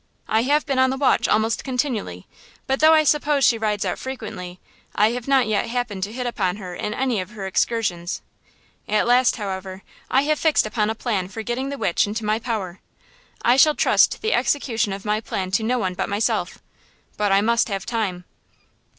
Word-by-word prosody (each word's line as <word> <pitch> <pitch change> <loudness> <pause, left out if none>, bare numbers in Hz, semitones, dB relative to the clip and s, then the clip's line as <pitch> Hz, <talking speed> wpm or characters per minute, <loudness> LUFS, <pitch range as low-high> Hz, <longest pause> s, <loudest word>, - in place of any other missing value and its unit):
I 220 +1 +2
have 290 +5 +2
been 275 -4 0
on 260 0 +4
the 265 - -2
watch 275 -1 +2
almost 220 +1 +1
continually; 245 - -3 0.4
but, 270 0 0
though 315 +1 +6
I 310 - +4
suppose 295 -1 +2
she 230 - +3
rides 210 -2 -1
out - - -2
frequently, 190 -9 -7 0.4
I 210 +2 +4
have 245 +1 -5
not 270 -2 +4
yet 215 +1 0
happened 235 -5 -3
to 205 - -10
hit 250 +2 -4
upon 190 -7 -1
her 185 -3 -8
in 210 +4 -4
any 255 -5 0
of 185 - -8
her 210 -3 -7
excursions. 190 -3 -1 0.6
At 210 +1 +1
last, 245 +1 +4
however, 190 -3 -6 0.3
I 265 +2 +3
have 305 +1 0
fixed 315 -7 +3
upon 215 0 -1
a 220 - -2
plan 210 -6 -2
for 220 +3 -7
getting 250 +4 -3
the 280 - -5
witch 185 -4 +1
into 215 +2 -4
my 215 +1 +1
power. 210 -7 -4 0.7
I 245 +2 +5
shall 300 +2 +5
trust - - +3
the 440 - +1
execution 230 -7 0
of 195 +1 -6
my 210 +1 0
plan 185 -4 -4
to 195 - +1
no 250 +3 +1
one 185 -6 -1
but - - -3
myself. 205 +2 -1 0.5
But 210 -1 0
I 195 +1 +4
must 235 +2 +2
have 195 -1 -3
time." 200 -7 -2
225 Hz, 200 wpm, -22 LUFS, 200-255 Hz, 0.7 s, though